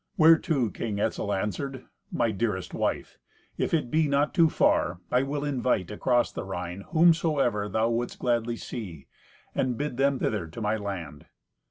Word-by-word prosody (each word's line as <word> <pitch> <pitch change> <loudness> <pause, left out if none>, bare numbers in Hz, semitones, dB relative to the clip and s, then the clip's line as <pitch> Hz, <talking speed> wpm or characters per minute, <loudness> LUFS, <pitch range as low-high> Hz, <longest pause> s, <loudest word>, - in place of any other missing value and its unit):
Whereto 155 - +4
King 105 +1 -3
Etzel 105 -1 -1
answered, 130 +7 -3 0.3
"My 115 -2 +1
dearest 105 -3 -2
wife, - - -2 0.4
if - - -1
it 150 -8 0
be 160 -1 +3
not 145 +1 +1
too 165 -2 +5
far, 85 - +2
I 125 - +4
will 140 +2 -2
invite 125 -9 0
across 120 +3 +1
the - - -5
Rhine 90 0 -5
whomsoever 155 -10 +3
thou 110 +3 +1
wouldst 120 +1 -2
gladly 120 -1 0
see, 90 - -7 0.5
and 125 -3 0
bid 145 -3 -3
them 135 0 +2
hither 100 -7 -1
to 80 - -9
my 105 0 0
land." 90 -9 -6
120 Hz, 160 wpm, -27 LUFS, 100-140 Hz, 0.5 s, too